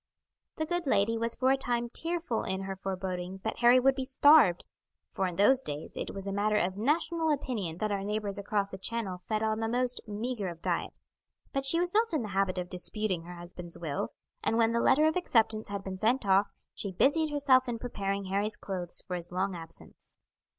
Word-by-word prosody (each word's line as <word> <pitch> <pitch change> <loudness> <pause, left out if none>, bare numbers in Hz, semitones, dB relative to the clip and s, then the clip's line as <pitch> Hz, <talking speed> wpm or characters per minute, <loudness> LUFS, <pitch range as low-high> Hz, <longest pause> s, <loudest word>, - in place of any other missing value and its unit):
The 315 - -1
good 350 -1 -2
lady 220 -1 +2
was 230 +1 0
for 260 +1 +2
a 270 - +3
time 240 -2 0
tearful 330 -2 -2
in 190 0 -3
her 195 0 -4
forebodings 190 -1 -4
that 220 - -4
Harry 245 +1 +7
would 270 +2 +4
be 265 0 -3
starved, 265 - +5 0.5
for 190 - -1
in 180 - -5
those 255 +8 +5
days 150 - -6
it - - -4
was 195 -1 -7
a 200 - -3
matter 210 +2 +1
of 185 -1 0
national 320 - +1
opinion 235 - -2
that 215 +2 -1
our 200 -1 -1
neighbours 205 -1 -2
across 200 0 -1
the 190 - -7
Channel 195 -3 -3
fed 215 +4 -2
on 220 0 0
the 225 - -1
most 250 +1 +1
meagre 215 0 -3
of 170 -2 -6
diet; - - -2 0.6
but 275 0 -1
she 330 - +4
was 350 0 +1
not 445 -2 +2
in 300 -6 +1
the 215 - -5
habit 195 -1 0
of 180 -1 -2
disputing 185 0 -2
her 180 +1 -8
husband's 175 0 -8
will, 150 -4 -3 0.3
and 225 - +1
when 230 -1 +4
the 235 - +1
letter 300 +3 +4
of 315 - +2
acceptance 225 -10 +1
had 200 -1 -5
been 190 -1 -6
sent 235 +3 +2
off, 195 +1 +4 0.3
she 200 - -5
busied 305 - +2
herself 270 -3 +3
in 235 - -2
preparing 200 -4 -3
Harry's 205 +3 0
clothes 180 -3 -4
for 180 - -3
his 175 0 -6
long 190 +2 -1
absence. 165 -1 -10
215 Hz, 215 wpm, -30 LUFS, 190-255 Hz, 0.6 s, Harry